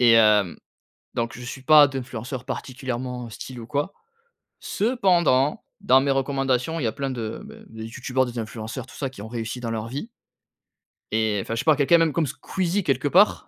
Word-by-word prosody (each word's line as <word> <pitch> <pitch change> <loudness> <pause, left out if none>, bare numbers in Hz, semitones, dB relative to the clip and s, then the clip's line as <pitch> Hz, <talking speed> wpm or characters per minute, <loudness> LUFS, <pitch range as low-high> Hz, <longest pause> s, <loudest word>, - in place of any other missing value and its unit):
Et 120 -2 +7
hem, 105 -5 +5 0.6
donc 115 0 -2
je - - -9
suis 130 +2 -7
pas 150 +1 +8
d'influenceurs 130 -1 -5
particulièrement 125 -2 -4
style 125 +2 -8
ou 115 - -9
quoi. 145 +7 -1 0.7
Cependant, 175 - +2 0.2
dans 130 +1 +5
mes 140 0 +1
recommandations, 135 +2 0
il - - -2
y - - +2
a - - 0
plein 135 +3 -3
de, 115 -3 -4
beh, 220 +1 -12
de 110 0 -9
youtubeurs, 130 +3 -1
des 120 -1 -5
influenceurs 110 +3 -5
tout - - -15
ça, 135 -2 -3
qui 125 - -11
ont 110 - -7
réussi 115 +1 -4
dans 115 -2 -3
leur 110 0 -3
vie 145 - -5 1.0
et 110 -2 +1
enfin, 115 - -4
je - - -2
sais - - -3
pas, 155 - +6
quelqu'un 150 +4 +5
même 165 -2 +2
comme 165 +1 +1
Squeezie, 185 +7 -2
quelque 135 -1 +1
part. 205 +8 +4
130 Hz, 195 wpm, -24 LUFS, 115-145 Hz, 1.0 s, pas